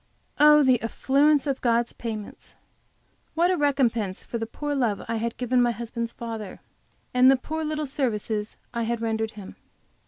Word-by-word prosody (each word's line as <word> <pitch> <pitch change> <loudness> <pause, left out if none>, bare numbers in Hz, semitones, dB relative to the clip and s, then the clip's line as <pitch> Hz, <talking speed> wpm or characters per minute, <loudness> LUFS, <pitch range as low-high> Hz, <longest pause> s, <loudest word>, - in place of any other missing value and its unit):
Oh, 300 0 +7
the 255 -3 +3
affluence 280 +6 +2
of 275 -2 -2
God's 235 -1 +1
payments! 215 -3 -7 0.8
What 345 +3 +3
a - - +2
recompense 240 - 0
for 235 - -5
the 225 - -3
poor 290 +5 -4
love 240 -7 0
I 230 0 -1
had 230 +1 -3
given 250 0 +1
my 240 - +3
husband's 235 0 -4
father, 225 -5 -7 0.5
and 250 +1 +6
the 270 - +5
poor 315 +5 -4
little 305 0 -2
services 220 -6 -2 0.2
I 235 - -2
had 230 0 -1
rendered 220 -1 -2
him! 205 -3 -11
235 Hz, 165 wpm, -25 LUFS, 225-280 Hz, 0.8 s, Oh